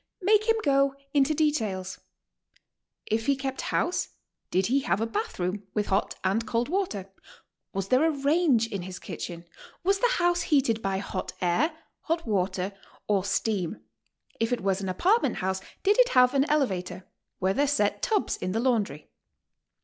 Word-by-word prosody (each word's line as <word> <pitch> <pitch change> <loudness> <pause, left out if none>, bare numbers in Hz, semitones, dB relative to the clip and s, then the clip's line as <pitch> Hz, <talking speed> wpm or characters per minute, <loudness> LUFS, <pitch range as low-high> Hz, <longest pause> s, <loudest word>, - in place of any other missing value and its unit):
Make 430 +3 +3
him 450 - +5
go 275 -1 +3 0.2
into 290 +1 +3
details. 220 -12 -1 1.1
If 220 +1 -1
he 280 - +4
kept 265 0 -4
house, 355 - 0 0.4
did 185 +1 +1
he 260 +6 +2
have 265 - 0
a 225 - +1
bath 425 - -3
room, 190 +3 -3
with 210 -1 +1
hot - - +1
and 195 +4 +1
cold 235 +3 0
water? 260 - -2 0.6
Was 195 0 -3
there 255 +4 +4
a - - +3
range 285 -4 +2
in 205 -5 -5
his 180 0 -7
kitchen? 170 -1 -7 0.4
Was 390 +2 +2
the - - +3
house 350 0 +2
heated 265 -9 +2
by 195 -2 -1
hot 190 -1 -4
air, 255 - +1 0.2
hot 330 +1 -2
water, 190 -2 -1 0.4
or 200 -3 +2
steam? 190 - -1 0.6
If 225 +1 0
it 245 - 0
was 195 0 0
an 190 - -3
apartment 380 - +2
house, 190 0 -2 0.2
did 410 +4 +3
it - - +6
have 250 +1 +6
an 275 +1 +2
elevator? 190 - -1 0.3
Were 190 +1 +1
there 285 +6 +2
set 210 -8 +1
tubs 425 -3 0
in 185 - -3
the 225 - 0
laundry? 220 - -1
230 Hz, 170 wpm, -27 LUFS, 190-300 Hz, 1.1 s, it